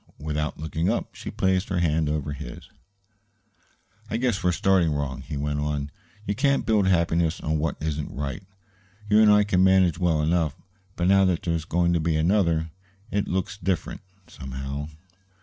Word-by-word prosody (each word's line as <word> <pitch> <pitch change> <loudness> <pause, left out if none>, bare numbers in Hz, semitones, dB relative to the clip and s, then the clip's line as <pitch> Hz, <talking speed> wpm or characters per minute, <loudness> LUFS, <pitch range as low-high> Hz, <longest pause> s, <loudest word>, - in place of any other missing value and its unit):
Without 75 0 -3
looking 80 +2 -1
up, - - -2
she - - -7
placed 95 0 0
her 95 - -1
hand 80 -3 +1
over 75 -1 -2
his. 70 - -9 1.4
"I 110 - -1
guess 120 -5 0
we 90 - +3
started 90 -1 +2
wrong," 70 -3 -3
he 75 - -6
went 75 +1 -2
on. 75 -1 -2 0.3
"You 100 - 0
can't 140 +3 +1
build 105 -3 +2
happiness 85 -2 +2
on 80 0 -1
what 75 0 -1
isn't 75 -1 -3
right. 70 +4 -4 0.7
You 105 +1 +6
and 105 -1 +6
I 105 0 +6
can 95 -3 +2
manage 95 -3 +4
well 80 -4 +2
enough; 80 -2 +1 0.4
but 85 - 0
now 95 0 +5
that 90 -2 0
there's 85 -2 -1
going 85 +1 +1
to 85 - +2
be 80 0 0
another, 80 -1 +1 0.4
it 100 0 0
looks 95 +2 -2
different, 95 -5 -2 0.2
somehow." 70 +1 -6
85 Hz, 170 wpm, -25 LUFS, 75-95 Hz, 1.4 s, You